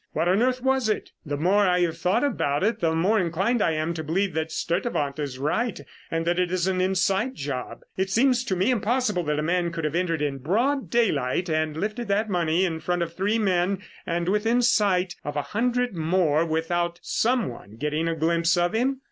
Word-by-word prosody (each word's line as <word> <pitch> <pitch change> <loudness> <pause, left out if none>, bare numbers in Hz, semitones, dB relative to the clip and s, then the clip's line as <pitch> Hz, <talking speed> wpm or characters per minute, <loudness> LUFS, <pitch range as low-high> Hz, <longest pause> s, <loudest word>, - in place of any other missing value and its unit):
"What 170 - 0
on 190 +4 +3
earth 255 0 +1
was 265 -3 +2
it? 215 - -2 0.2
The 145 0 -2
more 195 +6 +3
I 180 0 +2
have 165 -2 +1
thought 180 +8 +1
about 145 - 0
it, 225 +2 +1
the 160 -4 +1
more 195 +7 +2
inclined 190 +7 0
I 165 - +2
am 155 +2 -1
to 160 -1 -5
believe 185 +5 0
that 160 0 -2
Sturtevant 170 - -2
is 140 -3 -4
right 185 - -1 0.3
and 165 0 -2
that 175 +1 +1
it 180 -1 0
is 180 -1 0
an 185 -1 0
inside 190 +6 +1
job. 135 -3 -5 0.2
It 190 0 0
seems 245 +4 +3
to 195 - -1
me 190 +8 +2
impossible 230 -3 +1
that 150 0 0
a 150 - -1
man 175 +1 0
could 165 -1 -5
have 150 - -1
entered 165 -3 0
in 140 -2 -2
broad 240 - 0
daylight 175 - +1
and 155 -1 0
lifted 215 +6 -3
that 205 +2 0
money 175 0 +2
in 165 -3 -2
front 175 +1 -1
of 165 0 -6
three 200 +5 0
men 190 -1 +1 0.2
and 170 0 -2
within 225 +5 +2
sight 190 -6 +2
of 145 - -5
a 145 - -1
hundred 245 0 0
more 165 -1 +1
without 170 +2 -1
some 240 -1 +1
one 110 -3 -10
getting 150 +6 -1
a 165 - 0
glimpse 170 +2 +2
of 175 +3 +1
him. 260 +4 +1
180 Hz, 215 wpm, -25 LUFS, 160-215 Hz, 0.3 s, on